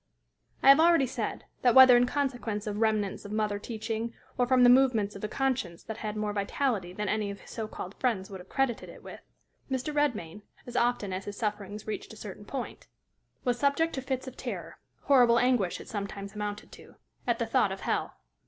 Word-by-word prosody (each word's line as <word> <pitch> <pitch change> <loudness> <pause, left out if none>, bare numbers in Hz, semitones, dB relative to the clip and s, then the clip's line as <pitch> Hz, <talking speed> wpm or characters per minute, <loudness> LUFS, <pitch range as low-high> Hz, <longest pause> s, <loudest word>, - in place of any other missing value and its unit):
I - - +7
have 275 +2 +9
already 330 -4 +5
said 255 - -4 0.2
that, 245 -1 +4
whether 260 -1 +10
in 245 +1 +4
consequence 245 -7 -2
of 210 -1 -3
remnants 215 -3 0
of 205 - -8
mother 210 -1 0
teaching 225 +1 -4 0.2
or 245 -1 +1
from 255 0 +5
the 245 - +8
movements 245 -6 +3
of 200 - -9
a - - 0
conscience 235 -8 -2
that 220 -1 -6
had 215 -1 -4
more 210 -1 -1
vitality 200 -2 -1
than 210 +2 -4
any 210 0 0
of 200 0 -7
his - - -14
so 220 -2 -4
called 190 -2 -7
friends 220 -7 0
would 195 -2 -8
have 180 - -13
credited 270 -4 -1
it - - -13
with, - - -10 0.5
Mr. 265 +3 -2
Redmain, 220 - -1 0.2
as 245 - -9
often 235 -6 +1
as 185 +1 -4
his 205 0 -6
sufferings 210 -1 -4
reached 215 0 -5
a - - -12
certain 205 0 -9
point, 260 +2 -6 0.6
was 245 -1 0
subject 285 +5 +2
to 265 - -3
fits 260 0 -3
of 260 - -8
terror - - -6 0.2
horrible 245 -4 +5
anguish 245 -7 +2
it - - -11
sometimes 200 -1 -5
amounted 210 0 -5
to - - -14 0.3
at - - +2
the - - -1
thought - - +2
of - - -6
hell. - - -1
220 Hz, 210 wpm, -29 LUFS, 205-255 Hz, 0.6 s, whether